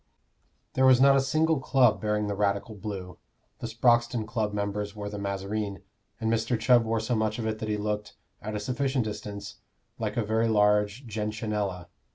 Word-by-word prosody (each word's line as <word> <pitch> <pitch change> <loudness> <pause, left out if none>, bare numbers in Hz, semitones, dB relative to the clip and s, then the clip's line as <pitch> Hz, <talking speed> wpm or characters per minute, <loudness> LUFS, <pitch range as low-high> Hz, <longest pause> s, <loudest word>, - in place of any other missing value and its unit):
There 130 0 +4
was 130 -1 +7
not 135 +1 +7
a 135 - +4
single 155 +3 +2
club 130 -4 +3
bearing 105 0 0
the 105 - -2
Radical 100 +2 0
blue: 95 -3 -7 0.4
the - - -4
Sproxton 120 0 +2
Club 110 -2 -1
members 105 0 -3
wore 105 -1 -5
the 105 0 -6
mazarine, 100 +1 -3 0.4
and 110 0 0
Mr. 115 +1 0
Chubb 120 +1 +5
wore 115 0 0
so 110 +3 -2
much 110 -1 0
of 115 - -3
it 110 -1 -2
that 110 - -4
he 105 - 0
looked 105 0 -3 0.3
(at 105 0 -5
a - - -1
sufficient 130 +2 -1
distance) 105 -1 -6 0.4
like - - -3
a 115 - +1
very 110 +2 +1
large 105 +3 +2
gentianella. 105 -4 -3
110 Hz, 185 wpm, -27 LUFS, 105-120 Hz, 0.4 s, was